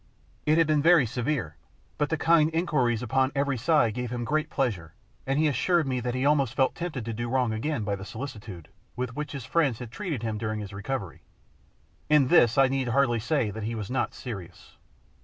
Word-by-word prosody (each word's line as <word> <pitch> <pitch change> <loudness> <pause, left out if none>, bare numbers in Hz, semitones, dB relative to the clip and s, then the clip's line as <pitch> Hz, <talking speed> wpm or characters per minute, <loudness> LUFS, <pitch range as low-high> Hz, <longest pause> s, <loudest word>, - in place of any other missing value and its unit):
It 155 +1 +4
had 165 - +5
been 155 -1 +2
very 165 -3 +6
severe, 120 - -2 0.4
but 150 - +1
the 160 - 0
kind 160 -1 +4
inquiries 130 -9 +1
upon 130 +3 +1
every 140 0 +1
side 125 -2 +2
gave 125 +1 -4
him 120 0 -3
great 155 +4 0
pleasure, 90 - -2 0.3
and 135 +1 +1
he 155 +1 +3
assured 160 +5 +2
me 130 -2 -1
that 120 0 -3
he 130 - -1
felt 140 - +4
almost 140 -6 +1
tempted 155 -9 -5
to 115 - -3
do 120 +2 -4
wrong 125 -3 +1
again 125 +2 -2
by 100 -1 -1
the 95 - -8
solicitude 105 - -8 0.3
with 125 -1 -4
which 150 +1 -4
his 135 -5 -6
friends 140 -5 +1
had 120 -2 -8
treated 155 - -4
him 110 -2 -2
during 110 -1 -2
his 105 -1 -7
recovery: 100 -1 -5 0.9
in 150 -4 +4
this 120 -9 +5
I 135 -1 +6
need 130 -1 -1
hardly 120 -1 +2
say 120 -2 0
that 110 - -6
he 115 +2 -3
was 110 0 -5
not 130 -2 -1
serious. 100 -9 -9
125 Hz, 210 wpm, -27 LUFS, 110-150 Hz, 0.9 s, very